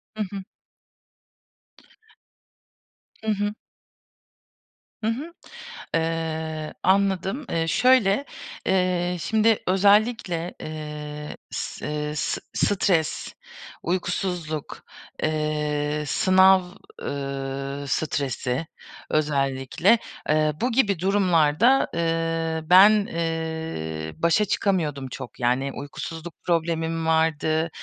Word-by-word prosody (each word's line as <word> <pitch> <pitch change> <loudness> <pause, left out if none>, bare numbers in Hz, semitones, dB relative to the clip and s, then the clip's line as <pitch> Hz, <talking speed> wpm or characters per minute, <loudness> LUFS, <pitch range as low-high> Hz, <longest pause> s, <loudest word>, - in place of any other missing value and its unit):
Hı 215 - -1
hı. 195 -1 -5 2.8
Hı 220 - +1
hı. 205 0 -1 1.5
Hı - - +1
hı. 280 +9 -3 0.6
Iıı, 160 -1 -2
anladım. 195 - +1
Iıı, 165 -1 0
şöyle, 250 - +4 0.4
ııı, 180 -1 +1
şimdi 220 +4 +2
özellikle, 195 -2 +2
ııı, 150 -1 -6 0.2
s - - -5
ııı, 150 0 -3
s 150 - -2
s - - +2
stres, 170 -5 0 0.5
uykusuzluk, 175 -3 -3 0.4
ııı, 150 -1 -1
sınav, 190 +5 +5 0.4
ııı, 140 0 -4
stresi 140 -1 -1 0.4
özellikle, 145 - +2 0.3
ııı, 155 0 +3
bu 250 +2 +1
gibi 210 -7 +2
durumlarda, 190 - +3
ııı, 165 -1 -1
ben, 190 +4 +9 0.2
ııı, 160 - -4
başa 170 +6 +4
çıkamıyordum 160 -9 0
çok. 130 -1 -9
Yani 125 +3 +1
uykusuzluk 160 +4 -7
problemim 165 -1 0
vardı, 160 0 +1
165 Hz, 85 wpm, -24 LUFS, 150-190 Hz, 2.8 s, ben